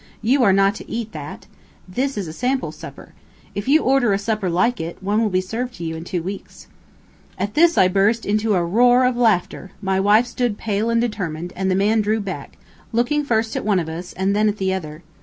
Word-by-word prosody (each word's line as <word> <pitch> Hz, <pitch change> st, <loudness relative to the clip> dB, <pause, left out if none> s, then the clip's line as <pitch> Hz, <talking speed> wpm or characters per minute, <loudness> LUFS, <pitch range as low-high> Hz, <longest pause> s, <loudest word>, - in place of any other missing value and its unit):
"You 260 Hz, +5 st, +3 dB
are 200 Hz, -, +5 dB
not 195 Hz, +1 st, +3 dB
to -, -, -11 dB
eat 225 Hz, -1 st, -4 dB
that. 150 Hz, -2 st, -8 dB, 0.4 s
This 260 Hz, +8 st, -2 dB
is 195 Hz, -4 st, -3 dB
a 155 Hz, -, -7 dB
sample 255 Hz, +7 st, -1 dB
supper. -, -, -11 dB, 0.4 s
If 205 Hz, +3 st, -5 dB
you 305 Hz, +4 st, +4 dB
order 255 Hz, -5 st, +3 dB
a -, -, +2 dB
supper 205 Hz, -2 st, -2 dB
like 230 Hz, +7 st, +1 dB
it, 165 Hz, +1 st, -6 dB
one 205 Hz, +3 st, 0 dB
will 220 Hz, -, +1 dB
be 185 Hz, -1 st, +1 dB
served 240 Hz, +6 st, -4 dB
to 175 Hz, -, -8 dB
you 160 Hz, -1 st, -3 dB
in 160 Hz, +1 st, -7 dB
two 175 Hz, -3 st, -3 dB
weeks." 195 Hz, +2 st, -8 dB, 0.7 s
At 200 Hz, +2 st, -3 dB
this 335 Hz, +1 st, +4 dB
I 185 Hz, -, +6 dB
burst 200 Hz, +5 st, +1 dB
into 210 Hz, 0 st, +1 dB
a 175 Hz, -2 st, +1 dB
roar 245 Hz, +7 st, +4 dB
of 250 Hz, -1 st, +1 dB
laughter; 215 Hz, -5 st, 0 dB
my 190 Hz, -1 st, 0 dB
wife 210 Hz, +4 st, +4 dB
stood 240 Hz, -3 st, -2 dB
pale 215 Hz, +1 st, -1 dB
and 230 Hz, 0 st, +2 dB
determined, 180 Hz, -7 st, -3 dB
and 190 Hz, 0 st, -1 dB
the 185 Hz, -, +2 dB
man 210 Hz, +3 st, +2 dB
drew 215 Hz, +1 st, 0 dB
back, 200 Hz, -2 st, -6 dB, 0.3 s
looking 245 Hz, +6 st, +1 dB
first 225 Hz, -4 st, 0 dB
at -, -, -2 dB
one 205 Hz, -2 st, +2 dB
of 160 Hz, -2 st, -4 dB
us, 175 Hz, +3 st, -7 dB
and 190 Hz, +2 st, 0 dB
then 215 Hz, +1 st, +3 dB
at 210 Hz, -, -3 dB
the 190 Hz, -1 st, 0 dB
other. 155 Hz, -3 st, -6 dB
205 Hz, 230 wpm, -21 LUFS, 185-235 Hz, 0.7 s, I